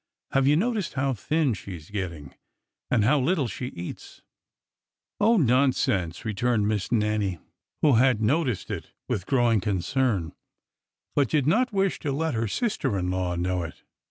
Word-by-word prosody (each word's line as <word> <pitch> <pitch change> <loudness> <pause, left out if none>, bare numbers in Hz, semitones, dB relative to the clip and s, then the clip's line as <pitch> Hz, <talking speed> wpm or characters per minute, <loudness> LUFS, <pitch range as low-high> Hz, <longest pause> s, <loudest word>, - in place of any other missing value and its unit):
Have 135 0 +3
you 145 - +5
noticed 210 0 -1
how 135 0 +1
thin 150 +3 0
she 95 -2 -7
is 80 +2 -13
getting, 85 -9 -5 0.6
and 115 -4 +3
how 140 +7 +4
little 145 0 +1
she 125 +2 -5
eats? 90 -7 -9 0.5
" - - -65
Oh, 225 +3 +5
nonsense!" 125 - +2
returned 110 0 +1
Miss 105 -3 -1
Nannie, 105 -5 +1 0.5
who 145 -7 +5
had 125 -2 +4
no 135 +10 +2
ticed 125 - -3
it - - -6
with 90 - -2
growing 120 -6 +3
concern, 100 -1 0 0.8
but 140 -5 +2
did 145 -4 +2
not 240 - +2
wish 195 -2 0
to 145 - -2
let 160 +2 -1
her 115 0 0
sister 200 - -1
in 90 -1 -1
law 90 -1 -1
know 90 +1 -1
it. 85 - -8
120 Hz, 165 wpm, -26 LUFS, 95-145 Hz, 0.8 s, you